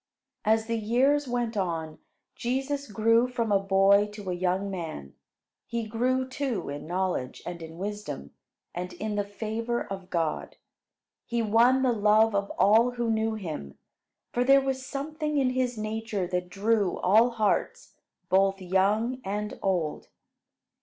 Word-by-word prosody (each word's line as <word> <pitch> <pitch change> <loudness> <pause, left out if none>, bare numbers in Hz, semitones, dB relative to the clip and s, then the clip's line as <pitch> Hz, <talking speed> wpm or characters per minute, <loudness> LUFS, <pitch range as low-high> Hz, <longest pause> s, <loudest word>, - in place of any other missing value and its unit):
As 220 0 +2
the 230 0 -1
years 265 +6 +2
went 240 -2 -1
on, 165 -5 -2 0.4
Jesus 270 +1 -2
grew 230 +4 +3
from 235 -3 -2
a 200 - +5
boy 195 +1 +4
to 205 -3 -5
a - - 0
young 185 +2 -1
man. 160 - -6 0.5
He 235 -1 -2
grew, 255 +4 0
too, 260 - -3
in 145 +2 -6
knowledge, 180 -7 -2
and 175 -1 -6
in 160 0 -9
wisdom, 200 - -5 0.4
and 180 +1 -5
in 215 - -4
the 205 0 0
favor 220 +3 -3
of 195 -1 -7
God. 165 -3 -2 0.7
He 235 -1 0
won 235 +5 +4
the 255 - +3
love 215 +1 +4
of 200 0 0
all 225 +4 +5
who 240 -2 -1
knew 220 0 0
him, 155 - -6 0.6
for 245 - +2
there 275 +2 +6
was 265 -1 -2
something 300 +3 -3
in 260 -2 +2
his 255 -2 -1
nature 215 -2 -2
that 180 0 -3
drew 200 0 +1
all 220 +6 +4
hearts, 220 -3 -1 0.3
both 195 +1 +3
young 205 +7 +1
and 210 +2 -4
old. 175 -6 -1
215 Hz, 150 wpm, -27 LUFS, 190-240 Hz, 0.7 s, there